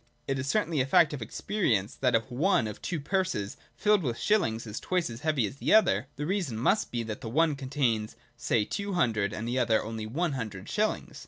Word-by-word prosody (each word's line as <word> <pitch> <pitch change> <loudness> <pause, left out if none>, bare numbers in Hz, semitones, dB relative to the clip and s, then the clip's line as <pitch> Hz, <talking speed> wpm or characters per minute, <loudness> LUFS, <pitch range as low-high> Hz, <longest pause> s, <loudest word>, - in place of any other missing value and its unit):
It 135 -1 -1
is 135 - -3
certainly 165 -5 +1
a 130 - 0
fact 165 0 +5
of 140 - -5
experience 110 - -1
that, 125 -3 +1
if 115 +3 -1
one 140 - +2
of 105 -1 -6
two 170 -3 -3
purses 185 - -1 0.2
filled 210 -2 +3
with 120 -7 -2
shillings 160 - +1
is 105 -1 -5
twice 180 -8 -1
as 115 - -8
heavy 150 -7 +1
as 105 - -6
the - - +3
other, 125 - +4
the 145 - -4
reason 175 - -1
must 195 - +2
be, 120 -1 -2
that 110 -1 -6
the 115 - -5
one 155 +4 +2
contains, 130 -6 -1 0.2
say 120 -2 +1
two 200 - -3
hundred, 110 - +1
and 110 +2 -4
the 125 +2 0
other 115 -3 +2
only 110 0 -5
one 160 +8 -1
hundred 110 -7 -5
shillings. 215 +1 -1
130 Hz, 220 wpm, -28 LUFS, 110-170 Hz, 0.2 s, fact